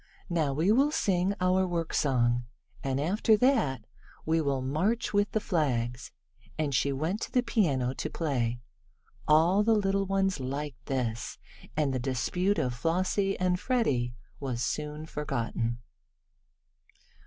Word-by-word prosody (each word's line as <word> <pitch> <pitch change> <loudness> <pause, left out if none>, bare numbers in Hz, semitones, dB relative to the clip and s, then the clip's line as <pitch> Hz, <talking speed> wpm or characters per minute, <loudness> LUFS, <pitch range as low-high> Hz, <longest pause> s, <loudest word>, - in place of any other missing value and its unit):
Now 160 -5 +1
we 160 +8 +2
will 270 +6 +4
sing 195 - +1
our 185 0 +2
worksong, 130 -8 +1 0.4
and 135 0 -1
after 210 +8 +3
that 150 - +2 0.4
we 160 +1 +2
will 140 -3 0
march 195 - 0
with 205 +1 +2
the 220 - +1
flags," 125 - -1 0.5
and 150 -3 -1
she 140 +2 +2
went 160 +10 -2
to - - -4
the 250 - +2
piano 145 - +1
to 155 - -4
play. 120 -8 -1 0.7
All 165 +6 +5
the 225 +1 +4
little 195 -1 +1
ones 195 -3 +1
liked 135 0 -5
this, 120 -4 -2 0.4
and 145 -3 +1
the 130 - 0
dispute 180 +10 0
of 125 - 0
Flossie 185 +8 0
and 180 -1 +1
Freddie 135 - 0 0.2
was 125 -4 -2
soon 150 +3 -3
forgotten. 120 -6 -2
155 Hz, 135 wpm, -29 LUFS, 130-195 Hz, 0.7 s, All